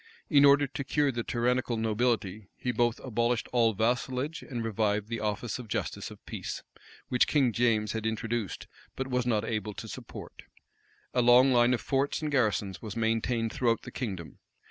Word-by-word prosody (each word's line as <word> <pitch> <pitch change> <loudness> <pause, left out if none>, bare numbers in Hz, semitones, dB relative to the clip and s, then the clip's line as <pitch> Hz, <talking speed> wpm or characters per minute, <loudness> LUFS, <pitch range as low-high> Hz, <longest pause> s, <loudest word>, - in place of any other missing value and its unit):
In 145 -2 +7
order 140 +1 +6
to 140 +1 -5
cure 145 +1 +1
the 120 -2 -2
tyrannical 120 0 0
nobility, 110 -3 0
he 125 - -1
both 120 0 +1
abolished 120 -1 0
all 115 -2 +4
vassalage,[*] 125 +7 -1
and 120 -4 -5
revived 105 -1 0
the 115 -1 -2
office 105 +3 -2
of 125 - -8
justice - - -3
of - - -14
peace, - - -5 0.5
which 125 - +3
King 135 -6 +2
James 110 -3 +2
had 110 0 -2
introduced, 110 -2 -3 0.3
but 130 0 -3
was 125 -1 0
not 110 -3 +1
able 105 -2 -3
to - - -7
support.[] - - -9 0.7
A 125 - +3
long 125 +2 +6
line 120 +1 +5
of 115 - -6
forts 135 +5 0
and 150 - -1
garrisons 105 -8 0
was 105 -2 -6
maintained 115 0 0
throughout 115 -3 +1
the - - -8
kingdom. 95 -10 -5
120 Hz, 175 wpm, -29 LUFS, 110-125 Hz, 0.7 s, In